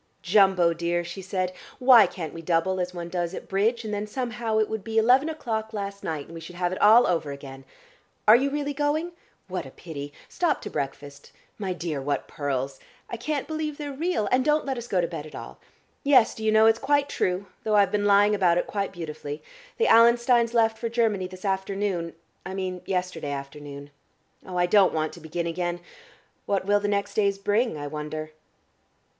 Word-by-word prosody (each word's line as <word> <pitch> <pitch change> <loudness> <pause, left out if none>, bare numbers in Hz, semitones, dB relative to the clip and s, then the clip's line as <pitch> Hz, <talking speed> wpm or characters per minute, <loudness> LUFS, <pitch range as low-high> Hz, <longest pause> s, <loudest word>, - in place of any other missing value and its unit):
"Jumbo, 185 -2 +4
dear," 170 +1 -1
she 175 +3 -7
said, 185 -1 -2 0.2
"why 250 -6 +7
can't 165 -4 -6
we 165 - -7
double 170 +3 +1
as 180 0 -2
one 175 -1 -6
does 175 0 -3
at - - -8
bridge, 225 +4 0
and 210 - -4
then 205 +1 -3
somehow 235 -1 -2
it 215 -1 +3
would 220 -3 -4
be 225 0 -3
eleven 255 +7 +5
o 320 - -4
'clock 220 -6 -3
last 200 -1 -5
night, 155 -3 -3
and - - -13
we 165 - -7
should 175 +2 -10
have 175 0 -1
it 185 - -4
all 220 +4 +7
over 165 -5 0
again? 135 -1 -9 0.6
Are 215 - +10
you 270 +3 +2
really 290 0 -2
going? 300 +4 0 0.4
What 180 -6 -4
a - - -9
pity! 145 -1 -8 0.2
Stop 335 -5 0
to - - -6
breakfast 140 0 -6 0.3
my 195 -3 -2
dear, 165 -5 -4
what 140 0 -2
pearls! 135 -2 -3 0.3
I 235 - -3
can't 285 +4 -3
believe 310 -2 -3
they're 290 -2 -5
real 300 - -1
and 255 0 +3
don't 300 +2 +2
let 270 -1 -1
us 240 -1 -6
go 190 -6 +1
to 170 - 0
bed 160 -3 -6
at - - -12
all. - - -9 0.4
Yes, 260 -5 +5
do 220 - -8
you 220 - +2
know, 220 0 +6
it's 225 0 +4
quite 285 +1 +2
true 185 -7 -1 0.2
though 215 -1 +1
I've 200 -1 +4
been 205 -1 0
lying 205 +1 +5
about 180 -4 +3
it - - +1
quite 200 -1 -3
beautifully 155 -4 -7 0.3
the 465 - +2
Allensteins 235 0 +5
left 225 -1 +3
for 230 - -2
Germany 220 -5 +1
this 185 +1 -11
afternoon, 190 -3 -2 0.3
I 190 - -6
mean 185 -2 -3
yesterday 180 -5 -2
afternoon. 140 0 -8 0.6
Oh, 180 -1 -5
I 175 - +3
don't 190 -1 +4
want 155 0 -1
to - - -11
begin 165 +1 -4
again.... 175 +1 -2 0.7
What 195 -2 0
will 205 +1 +3
the 205 - -2
next 200 0 -1
days 200 -2 +1
bring, 205 0 0
I 145 - -5
wonder?" 155 +1 -5
195 Hz, 210 wpm, -26 LUFS, 170-225 Hz, 0.7 s, Are